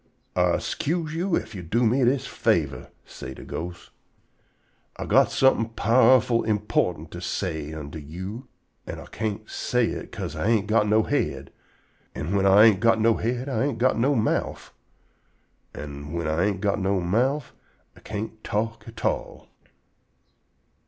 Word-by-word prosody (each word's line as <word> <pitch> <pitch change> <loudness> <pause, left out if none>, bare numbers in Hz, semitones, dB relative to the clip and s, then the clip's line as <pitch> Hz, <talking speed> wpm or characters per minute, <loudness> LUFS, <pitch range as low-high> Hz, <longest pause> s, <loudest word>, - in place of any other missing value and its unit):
"Ah - - +3
'scuse 160 0 -2
you 175 +2 0
ef - - -6
you 95 - -6
do 115 +9 +1
me 125 +4 +3
dis 130 +2 +2
favor," - - 0 0.2
say 65 - -9
de - - -10
ghost. 85 +1 -7 1.1
"Ah - - -4
got - - +4
somefin' 115 -4 +2
powerful 120 +1 +4
_im_portant 105 -7 -1
to 85 - -7
say 80 -5 -3
unto 80 0 -7
you, 95 - -7 0.4
an' - - -6
Ah - - -10
can't 110 0 -4
say 125 -2 0
hit - - -6
'ca'se - - -5
Ah - - -3
ain't 110 -1 +2
got 110 0 +2
no 110 +1 +4
head; - - -2 0.6
an' 75 +7 -3
whin 100 0 +3
Ah 95 +1 +6
ain't 110 -4 +6
got 115 0 +3
no 115 0 +3
head, 120 +3 -2
Ah 135 - -1
ain't 135 -3 0
got 130 +3 +3
no 135 +5 +2
mouf, 110 -2 -1 1.0
an' 70 0 -7
whin 85 -1 -2
Ah 80 +1 0
ain't 100 -1 0
got 100 0 +1
no 95 0 +1
mouf, 120 +10 0 0.4
Ah - - -16
can't 110 +1 -6
talk 115 +2 -2
at 115 - -8
all." - - -2
110 Hz, 160 wpm, -25 LUFS, 90-120 Hz, 1.1 s, Ah